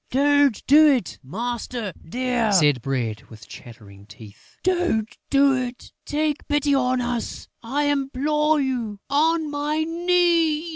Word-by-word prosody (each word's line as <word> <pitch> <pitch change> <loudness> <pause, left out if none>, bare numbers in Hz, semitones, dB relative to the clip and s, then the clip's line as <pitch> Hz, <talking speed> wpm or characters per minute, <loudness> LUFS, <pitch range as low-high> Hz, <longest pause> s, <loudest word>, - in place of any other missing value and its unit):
"Don't 285 -3 +2
do 305 +3 +6
it, 260 - 0
master 230 - -5
dear!" 245 +2 -1
said 145 -9 +3
Bread, 115 -5 -3
with 110 -2 -14
chattering 100 -4 -14
teeth. 105 0 -16
"Don't 350 - 0
do 275 0 +4
it! 250 -1 -5 0.2
Take 300 0 -2
pity 290 -1 +1
on 255 -1 +1
us! 240 -1 -4
I 270 +6 -2
implore 290 +2 +1
you 240 -7 -3
on 315 +1 +1
my 295 +2 -1
knees!" 335 -1 +1
265 Hz, 130 wpm, -23 LUFS, 215-300 Hz, 0.2 s, do